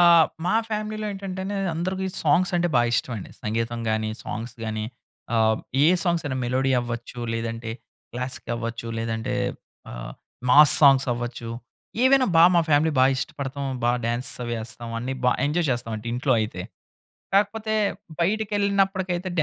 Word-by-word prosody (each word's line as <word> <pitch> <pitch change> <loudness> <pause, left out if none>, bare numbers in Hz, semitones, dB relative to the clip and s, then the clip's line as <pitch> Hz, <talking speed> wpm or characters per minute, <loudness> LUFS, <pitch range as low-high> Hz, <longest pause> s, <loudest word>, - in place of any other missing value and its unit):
ఆహ్, 170 -2 +7 0.2
మా 185 - +2
ఫ్యామిలీ‌లో 215 0 -3
ఏంటంటే 190 -1 -6
అండి 200 +1 -3 0.2
అందరికి 185 +3 -2 0.2
సాంగ్స్ 175 +5 +3
అంటే 175 0 +1
బాగా 120 0 +3
ఇష్టమండి 115 -5 -3
సంగీతం 115 +2 -2
గాని, 110 0 -1
సాంగ్స్ 115 +2 -5
గాని 110 -1 -3 0.5
ఆహ్, 110 -1 +3 0.3
ఏ - - +6
సాంగ్స్ 170 -1 +1
అయినా 130 - -2
మెలోడీ 130 +2 0
అవ్వచ్చు, 120 0 -6
లేదంటే 115 0 -4 0.4
క్లాసిక్ 125 0 -5
అవ్వచ్చు 115 0 -5
లేదంటే 115 0 -2 0.6
ఆహ్, - - -7 0.4
మాస్ 145 +2 +9
సాంగ్స్ 135 -1 +6
అవ్వచ్చు. 120 -1 -5 0.6
ఏవైనా 260 0 +5
బా 165 - +8
మా 170 - +5
ఫ్యామిలీ 155 +2 +3
బా 130 - +6
ఇష్టపడతాం, 140 +1 -4 0.2
బా 120 - +3
డాన్స్ 120 +3 -1
అవి 120 0 -3
ఏస్తాం 120 0 -8
అన్నీ 125 +3 -3
బా 125 - +5 0.2
ఎంజాయ్ 165 +3 0
చేస్తాం 120 -2 -2
అండి 110 +2 -7
ఇంట్లో 130 +2 +1
అయితే. 105 -4 -3 0.7
కాకపోతే 215 +2 +1 0.5
బయటికెళ్ళినప్పటికైతే 195 -2 0
130 Hz, 145 wpm, -24 LUFS, 115-180 Hz, 0.7 s, మాస్